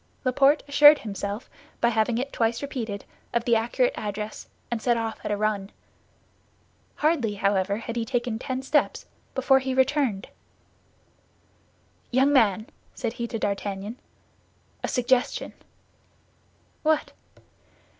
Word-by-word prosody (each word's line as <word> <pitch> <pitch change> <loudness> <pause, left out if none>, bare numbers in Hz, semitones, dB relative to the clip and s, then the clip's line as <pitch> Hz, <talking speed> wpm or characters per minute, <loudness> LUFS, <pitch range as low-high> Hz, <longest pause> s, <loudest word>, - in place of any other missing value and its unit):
Laporte 275 +3 +4
assured 295 +1 +8
himself, 205 0 -5 0.3
by 235 - +3
having 225 +1 +1
it 270 +3 -3
twice 230 +2 0
repeated, 230 -8 -4 0.3
of 235 - +1
the 235 - +4
accurate 240 - +1
address, 210 0 -5 0.2
and 235 -2 -1
set 240 0 +2
off 225 -1 -3
at - - -3
a 205 - 0
run. 210 -2 -1 1.2
Hardly, 290 -9 +1
however, 200 0 +1
had 230 +1 -6
he 235 - 0
taken 240 -1 -2
ten 260 0 -4
steps 295 +3 +1 0.3
before 265 0 +4
he 265 0 -2
returned. 260 -6 +1 1.8
"Young 265 +3 +3
man," 215 -5 +3 0.3
said 235 -3 -3
he 235 -1 -4
to 230 - -4
D'Artagnan, 200 +1 -3 0.8
"a - - 0
suggestion." 250 0 0 1.3
"What?" 310 -1 +1
235 Hz, 125 wpm, -26 LUFS, 215-265 Hz, 1.8 s, assured